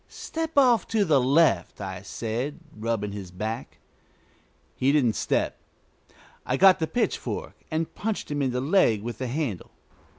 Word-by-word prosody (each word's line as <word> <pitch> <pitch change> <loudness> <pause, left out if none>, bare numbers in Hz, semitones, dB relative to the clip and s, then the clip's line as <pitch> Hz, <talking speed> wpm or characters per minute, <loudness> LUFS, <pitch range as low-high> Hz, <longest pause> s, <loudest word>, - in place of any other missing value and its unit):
"Step 325 -1 -5
off 245 -7 +5
to 215 -3 +2
the 145 -6 +4
left," 145 +6 +3
I 95 -2 -5
said, 115 - -4 0.2
rubbing 110 -2 -2
his 100 -3 -7
back. 110 +7 -5 1.0
He 135 +2 +2
didn't 135 -7 +3
step. - - -1 0.8
I 130 - -1
got 190 +2 +7
the 160 - 0
pitchfork 240 +10 -2 0.2
and 160 0 -2
punched 215 -7 -3
him 145 0 -1
in 135 - +1
the 125 0 -1
leg 135 - +3
with 120 +1 -5
the 130 - -2
handle. 125 - -3
130 Hz, 155 wpm, -26 LUFS, 110-165 Hz, 1.0 s, got